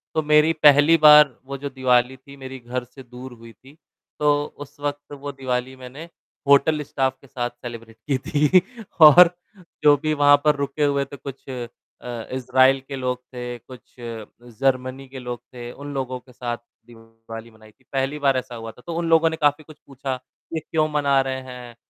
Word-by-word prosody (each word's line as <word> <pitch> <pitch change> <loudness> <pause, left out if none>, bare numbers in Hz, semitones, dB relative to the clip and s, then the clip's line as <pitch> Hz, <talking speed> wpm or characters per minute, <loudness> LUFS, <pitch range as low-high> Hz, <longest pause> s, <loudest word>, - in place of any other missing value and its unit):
तो 155 - +2
मेरी 150 +2 +4
पहली 145 +3 +7
बार 150 -3 +8
वो 140 +1 -6
जो 140 +1 -5
दिवाली 130 -1 +1
थी, 140 +2 -15
मेरी 130 0 -9
घर 125 +1 -5
से 130 +2 -14
दूर 125 +1 -11
हुई 115 -1 -14
थी, 140 +4 -20 0.4
तो 145 0 +2
उस 145 0 -12
वक़्त 145 0 -5
वो 145 0 -7
दिवाली 130 -1 -3
मैंने 130 +6 -11 0.4
होटल 140 +2 +4
स्टाफ़ 135 -2 -1
के 140 - -18
साथ 120 -2 -3
सेलिब्रेट 115 -2 -10
की 135 - +3
थी 150 +7 +3 0.4
और 165 +3 +9 0.5
जो 145 -1 +7
भी 155 +2 -1
वहाँ 145 -1 +5
पर 150 -1 +4
रुके 140 +1 -2
हुए 140 -1 +1
थे 140 - -11
कुछ 135 0 -10
अ, 125 -2 -5 0.7
इज़राइल 130 +1 +3
के 140 - -6
लोग 125 -1 -2
थे, 125 -1 -6
कुछ 125 0 -16 0.6
जर्मनी 130 0 -1
के 130 0 -9
लोग 125 -1 -6
थे, 120 -1 -8
उन 145 +2 -9
लोगों 130 -2 -4
के 125 0 -20
साथ 120 0 -4 0.3
दिवाली 115 0 -12
मनाई 110 -1 -19
थी, - - -34
पहली 135 +2 -1
बार 135 -2 +2
ऐसा 125 -1 -5
हुआ 115 -1 -7
था, 125 - -19
तो 165 - -4
उन 170 -1 -2
लोगों 165 0 +4
ने 160 - -4
काफ़ी 145 +1 +2
कुछ 155 0 -15
पूछा 135 -1 -4 0.4
कि 160 - -1
क्यों 155 0 -1
मना 140 -2 +2
रहे 130 0 -3
हैं? 125 -2 -10
135 Hz, 190 wpm, -22 LUFS, 125-145 Hz, 0.7 s, और